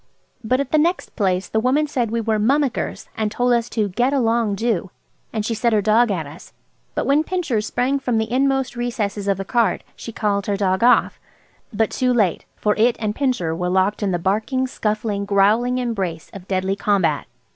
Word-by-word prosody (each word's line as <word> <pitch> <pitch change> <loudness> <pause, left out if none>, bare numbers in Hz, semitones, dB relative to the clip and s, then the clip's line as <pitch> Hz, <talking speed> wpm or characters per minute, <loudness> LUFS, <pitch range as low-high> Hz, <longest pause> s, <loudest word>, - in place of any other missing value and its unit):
But 255 +4 +1
at 280 -2 -2
the 310 - +4
next 345 +4 0
place 190 -3 0
the 220 - 0
woman 260 +6 +2
said 255 -6 -1
we 230 +1 -1
were 220 -1 0
"mummickers," 270 +4 0
and 215 -1 -1
told 245 +2 +1
us 235 0 0
to 215 -3 0
"get 245 +8 0
along, 230 -5 +1
do." 220 -4 -1 0.4
And 215 -2 -2
she 230 - -1
set 230 +1 +1
her 215 - +4
dog 225 +3 +4
at 175 -6 -2
us; 145 +4 -13 0.4
but - - -1
when 285 +3 +3
Pincher 320 - -1
sprang 250 +5 0
from 250 -4 -1
the 220 0 -1
inmost 270 0 +1
recesses 215 -4 -3
of 195 -2 +1
the 195 - -5
cart 230 -3 +1
she 230 - -8
called 200 -3 -1
her 200 -1 0
dog 190 -1 0
off. 245 - +4 0.5
But 220 -1 0
too 255 -1 +1
late, 200 -8 +1
for 210 -1 0
it 235 +2 +3
and 215 -2 -1
Pincher 230 - -1
were 180 +1 -2
locked 190 +3 +1
in 205 - 0
the 180 - 0
barking, 215 +9 0
scuffling, 215 -4 -2
growling 210 +5 +2
embrace 195 -10 -3
of 195 -1 -10
deadly 190 0 0
combat. 195 -8 +1
220 Hz, 200 wpm, -21 LUFS, 200-245 Hz, 0.5 s, the